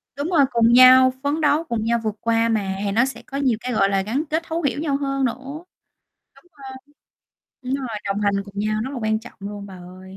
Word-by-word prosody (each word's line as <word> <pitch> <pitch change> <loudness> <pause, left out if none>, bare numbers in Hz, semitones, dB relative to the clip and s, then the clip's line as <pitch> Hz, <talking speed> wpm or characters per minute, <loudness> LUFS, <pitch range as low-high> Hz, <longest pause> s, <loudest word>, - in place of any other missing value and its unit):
Đúng 285 +4 -3
rồi 300 -6 +4
cùng 235 0 +3
nhau, 255 +1 +7
phấn 290 +3 -1
đấu 300 +1 +2
cùng 235 -8 -3
nhau 235 +1 +1
vượt 215 -1 -2
qua 230 0 +1
mà, 200 -4 -1
thì 200 - -1
nó 230 +6 +3
sẽ 270 - -7
có 275 - -7
nhiều 255 -6 +1
cái, 250 +1 -4
gọi 195 -2 +2
là, 195 -1 +1
gắn 240 +10 -2
kết 320 +2 -1
thấu 325 +1 -3
hiểu 285 -1 -1
nhau 290 -3 -1
hơn 275 -1 -1
nữa, 235 - 0 1.0
đúng - - -22
hông? 280 -3 -15 1.0
Đúng 255 +1 -3
rồi, 270 -2 -4 0.2
đồng 200 +1 -2
hành 200 -1 +1
cùng 200 0 -14
nhau 215 +1 -1
rất 265 - -5
là 255 - -5
quan 220 0 0
trọng 245 - -13
luôn 200 0 -7
bà 195 - -11
ơi. 185 +1 -13
235 Hz, 240 wpm, -21 LUFS, 205-275 Hz, 1.0 s, nhau